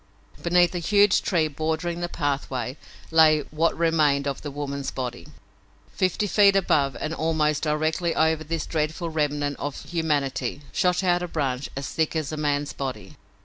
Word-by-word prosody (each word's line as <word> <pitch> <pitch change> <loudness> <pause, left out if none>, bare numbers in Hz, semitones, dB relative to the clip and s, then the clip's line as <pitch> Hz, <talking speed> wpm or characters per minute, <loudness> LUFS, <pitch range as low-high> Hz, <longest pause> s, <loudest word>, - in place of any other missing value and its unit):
Beneath 175 0 +3
a 175 - -2
huge 205 +3 +4
tree 165 -4 +1
bordering 160 +3 -2
the 175 0 -3
pathway 135 -5 -2 0.4
lay 155 -1 +6
what 160 +2 +1
remained 155 -4 +2
of 140 - -3
the 145 - -5
woman's 140 -1 -4
body. 125 +1 -5 0.7
Fifty 185 +2 0
feet 200 0 +5
above, 145 -8 +2
and 155 - -3
almost 155 -2 0
directly 155 +2 0
over 160 0 +2
this 160 0 -3
dreadful 160 +2 -2
remnant 145 -2 -1
of 145 0 -4
humanity, 150 -4 -1
shot 180 +1 +1
out 175 -1 +2
a 180 - -3
branch 140 -5 -2
as 135 -1 -3
thick 160 0 -1
as 155 -2 -2
a 155 - -4
man's 145 -1 -1
body. 135 +2 -6
155 Hz, 160 wpm, -25 LUFS, 145-170 Hz, 0.7 s, lay